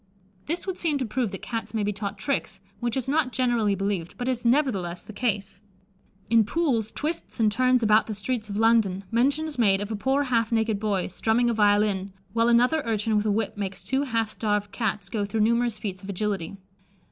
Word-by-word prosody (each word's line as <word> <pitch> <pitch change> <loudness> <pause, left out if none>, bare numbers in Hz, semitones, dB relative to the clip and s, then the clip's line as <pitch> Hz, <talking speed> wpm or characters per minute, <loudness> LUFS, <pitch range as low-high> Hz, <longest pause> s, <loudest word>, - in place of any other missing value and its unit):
This 335 +4 -2
would 380 -2 -4
seem 310 -4 +1
to 260 - -2
prove 235 +1 -1
that 195 - -8
Cats 230 -1 -4
may 215 - +1
be 205 +1 0
taught 200 0 -5
tricks, 215 -8 -2 0.2
which 240 +1 -1
is 260 - -2
not 285 -2 +1
generally 235 -6 +1
believed, 195 -3 -3
but 245 - -3
is 250 -2 -1
nevertheless 235 - +1
the 215 - -10
case. 200 -4 -2 0.7
In 230 -1 +5
Pool's 235 -4 0
Twists 315 -3 -4
and 215 -2 +4
Turns 255 +1 +3
about 215 0 +4
the 215 - -4
Streets 215 +2 -3
of 200 - -3
London, 220 -4 +3
mention 275 +7 +2
is 300 -5 -6
made 195 -4 +4
of 205 +2 -4
"a - - -1
poor 265 +7 +1
half 230 -4 0
naked 220 -2 +1
boy, 200 -3 0
strumming 230 +5 +1
a - - 0
violin, 205 -2 +2 0.2
while 230 0 +3
another 245 +6 +4
urchin 220 -1 0
with 210 +1 +1
a - - +2
whip 210 0 -1
makes 195 -2 -4
two 265 +1 0
half 230 -5 -1
starved 205 -2 -1
Cats 205 -3 -2
go 205 +1 -2
through 205 +2 -1
numerous 235 0 +2
feats 190 -3 -5
of 195 - -10
agility." 200 -2 -2
220 Hz, 210 wpm, -26 LUFS, 205-245 Hz, 0.7 s, In